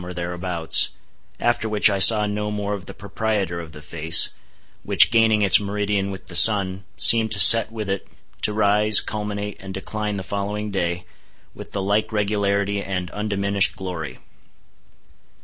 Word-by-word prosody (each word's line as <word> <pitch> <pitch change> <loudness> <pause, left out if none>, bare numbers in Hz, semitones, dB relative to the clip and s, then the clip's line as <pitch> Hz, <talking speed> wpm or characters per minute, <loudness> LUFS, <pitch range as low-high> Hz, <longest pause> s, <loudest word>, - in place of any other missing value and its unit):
or 90 0 -9
thereabouts, 85 -1 -2 0.5
after 120 -2 -2
which 105 -1 +2
I 100 -2 -1
saw 105 +3 +6
no 105 0 -4
more 105 -1 -5
of 95 -4 -8
the - - -9
proprietor 100 -3 -4
of 85 -2 -10
the 75 0 -14
face, 80 +1 +4 0.5
which - - +5
gaining 110 -2 +2
its 100 - +4
meridian 100 -1 -3
with 95 -1 -10
the - - -8
sun, 95 -3 +3
seemed 110 -1 +5
to 100 - -1
set 110 +4 +7
with 110 -2 -7
it, 95 0 -5 0.3
to - - +2
rise, 105 0 +3
culminate, 105 -1 -6
and 95 0 -10
decline 105 +2 -6
the 95 - -6
following 105 +2 -5
day, 90 -2 -4 0.5
with - - -12
the 100 - -4
like 105 +3 -2
regularity 100 -1 -2
and 90 -3 -6
undiminished 100 -1 -1
glory. 90 -5 -8
100 Hz, 160 wpm, -20 LUFS, 95-105 Hz, 0.5 s, set